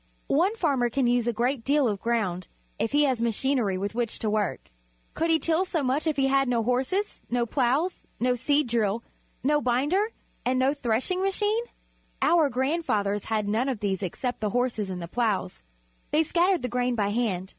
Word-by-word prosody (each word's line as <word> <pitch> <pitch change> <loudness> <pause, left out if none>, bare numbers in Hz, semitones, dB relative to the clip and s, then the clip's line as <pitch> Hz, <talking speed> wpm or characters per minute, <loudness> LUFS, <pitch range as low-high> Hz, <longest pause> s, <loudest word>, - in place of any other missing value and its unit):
One 365 +9 +3
farmer 275 - +1
can 260 +2 0
use 240 -1 +2
a - - +3
great 240 +2 0
deal 285 0 +3
of 205 -3 -2
ground 210 -7 -1 0.3
if 225 - 0
he 290 +1 +4
has 260 -5 +1
machinery 235 -3 0
with 200 +2 -3
which 235 -1 -2
to 215 - -2
work. 210 - -2 0.4
Could 330 - -1
he 325 - +5
till 330 +2 +1
so 335 -5 -2
much 270 +5 0
if 310 - 0
he 270 - +3
had 270 0 +3
no 235 -2 +1
horses, 260 - -1
no 240 0 +1
ploughs, 275 +9 0
no 250 +1 +2
seed 285 +5 +1
drill, 225 -1 0 0.4
no 295 +2 +2
binder, 290 - +1 0.4
and 255 +1 +1
no 260 +2 +3
threshing 265 +7 -1
machine? 415 +4 +1 0.5
Our 325 -4 +4
grand 270 +7 0
fathers 205 -7 0
had 215 -2 -1
none 225 +6 +1
of 250 -5 -2
these 195 -2 -1
except 245 +7 -3
the 215 - -1
horses 235 -3 -1
and 180 -2 -5
the - - -5
ploughs. 210 - -1 0.5
They 310 +2 +3
scattered 345 0 +2
the - - 0
grain 245 0 0
by 205 -3 0
hand. 205 -5 -1
250 Hz, 195 wpm, -26 LUFS, 220-290 Hz, 0.5 s, he